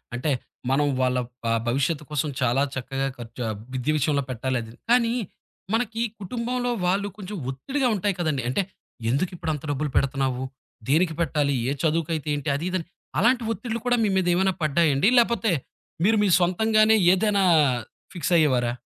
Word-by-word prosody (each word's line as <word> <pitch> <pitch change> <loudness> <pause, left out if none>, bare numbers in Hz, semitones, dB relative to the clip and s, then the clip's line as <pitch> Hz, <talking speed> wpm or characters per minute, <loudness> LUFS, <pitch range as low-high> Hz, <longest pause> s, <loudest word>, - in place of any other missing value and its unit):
అంటే 125 +5 -1 0.4
మనం 145 +2 +3
వాళ్ళ 125 0 +2 0.3
ఆహ్, 115 0 +2
భవిష్యత్తు 140 +5 0
కోసం 150 0 -1
చాలా 125 +2 +2
చక్కగా 135 +1 -2
ఖర్చు 120 +1 -7
ఆహ్, 110 - -3 0.2
విద్య 130 +4 -1
విషయంలో 145 -1 +1
పెట్టాలది, 120 -2 -3 0.2
కానీ, 235 -1 +4 0.6
మనకి 225 -1 0 0.2
కుటుంబంలో 245 +5 -2 0.2
వాళ్ళు 200 +3 +1
కొంచెం 205 +1 -6
ఒత్తిడిగా 260 - -1
ఉంటాయి 200 0 0
కదండీ. 155 -6 0
అంటే 130 +10 +1 0.5
ఎందుకిప్పుడంత 155 0 -2
డబ్బులు 145 +1 -1
పెడుతున్నావు? 135 -2 0 0.5
దేనికి 160 +4 +3
పెట్టాలి? 145 -3 +1
ఏ - - +1
చదువుకైతే 160 -1 0
ఏంటి? 145 +1 -4
అది 160 - -4
ఇదని 185 -3 -2 0.3
అలాంటి 245 +4 +3
ఒత్తిడిలు 230 0 -4
కూడా 245 0 +3
మీ 210 - +2
మీదేమైనా 185 +1 +2
పడ్డాయండి? 155 - +3
లేపోతే, 235 -3 +3 0.5
మీరు 220 0 +4
మీ - - +3
సొంతంగానే 215 +5 +4 0.2
ఏదైనా 200 0 +2 0.7
ఫిక్స్ 175 0 -2
అయ్యేవారా? 125 -6 +2
160 Hz, 145 wpm, -25 LUFS, 135-205 Hz, 0.7 s, కానీ